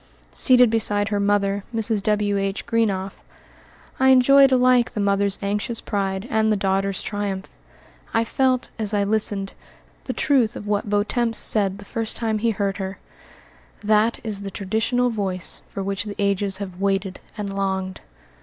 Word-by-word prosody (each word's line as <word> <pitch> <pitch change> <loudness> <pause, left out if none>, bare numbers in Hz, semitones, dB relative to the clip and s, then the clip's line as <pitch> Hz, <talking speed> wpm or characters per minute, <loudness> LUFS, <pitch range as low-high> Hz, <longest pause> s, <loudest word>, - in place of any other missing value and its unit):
Seated 250 -3 +5
beside 205 -2 +1
her 205 -2 -1
mother, 200 0 +1
Mrs. 220 -2 0
W.H. 205 -1 -1
Greenough, 200 -4 -1 0.8
I 265 0 +4
enjoyed 270 +1 +6
alike 250 -1 +4
the - - -2
mother's 200 -1 +1
anxious 210 +3 -2
pride 195 -1 -3
and 220 -2 +2
the 210 - +2
daughter's 195 0 -1
triumph. 200 -2 -4 0.6
I 225 - +2
felt, 255 +1 0
as 215 -1 +2
I 200 - +2
listened, 205 -1 -1 0.5
the - - -3
truth 255 -7 +1
of - - -7
what 205 -1 -1
Vieuxtemps 225 +3 +1
said 200 -3 +3
the 205 - -12
first 225 +1 -1
time 220 -2 -1
he 230 +2 +1
heard 200 -2 -1
her, 190 -1 -5 0.8
"That 215 +2 +2
is 210 -3 -3
the 200 - -5
traditional 225 +6 0
voice 190 -5 -3
for 195 - -5
which 195 +2 -3
the 205 -1 -6
ages 200 -1 0
have 190 -2 -7
waited 195 -1 -1 0.2
and 200 -2 -4
longed." 190 -1 -3
205 Hz, 155 wpm, -22 LUFS, 195-225 Hz, 0.8 s, enjoyed